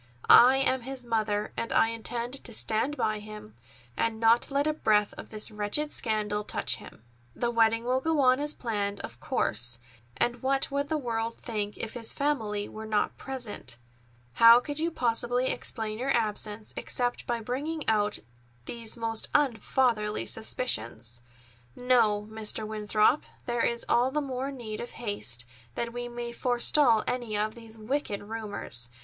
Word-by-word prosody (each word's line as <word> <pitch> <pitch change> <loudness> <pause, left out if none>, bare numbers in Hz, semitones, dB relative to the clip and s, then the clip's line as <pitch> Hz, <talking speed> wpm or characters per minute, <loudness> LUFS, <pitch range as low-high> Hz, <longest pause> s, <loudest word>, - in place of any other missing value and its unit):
I 255 +2 +9
am 260 -1 +2
his 260 +1 -5
mother, 215 -3 -1
and 230 - -3
I 225 - +4
intend 235 +3 -3
to 235 - -5
stand 225 +7 0
by 215 0 0
him, 210 - -10 0.4
and 225 -1 -1
not 230 +1 +5
let 280 +1 +1
a 310 - +2
breath 210 -8 +2
of - - -10
this 215 +1 -2
wretched 210 +9 -1
scandal 210 -2 0
touch - - +1
him. - - -13 0.3
The 240 - 0
wedding 230 0 +3
will 255 +2 +1
go 320 0 +1
on 255 0 +5
as 295 +1 -1
planned, 205 -4 -2
of 120 - -8
course, 120 +2 0 0.4
and 240 0 0
what 270 +1 +1
would 280 +1 -1
the 315 - 0
world 230 -4 -2
think 210 -3 -4
if 225 - -4
his 230 -2 +2
family 220 -8 -1
were 220 0 -8
not 210 -1 0
present? 235 - -5 0.6
How 230 - +8
could 290 +4 -4
you 330 +2 +1
possibly 245 -2 +1
explain 220 -2 -3
your 260 +2 -2
absence 215 -3 -1
except 245 -1 -2
by 240 -1 0
bringing 285 +7 -4
out 210 -1 +2 0.5
these 230 - -4
most 225 -1 -1
unfatherly 235 -5 +1
suspicions? 120 - -2 0.5
No, 225 -5 +2
Mr. 220 0 -1
Winthrop, 215 +4 +2 0.2
there 240 -1 -1
is 235 0 0
all 245 +2 +3
the 300 +3 -1
more 270 -1 -3
need 230 -5 -6
of 240 - -6
haste, 205 - -1 0.3
that 235 0 -3
we 245 0 -4
may 240 0 -5
forestall 245 -1 +3
any 240 -4 -2
of 215 +1 0
these 225 -1 -11
wicked 215 -2 -2
rumors. 205 - -4
230 Hz, 160 wpm, -28 LUFS, 215-255 Hz, 0.6 s, I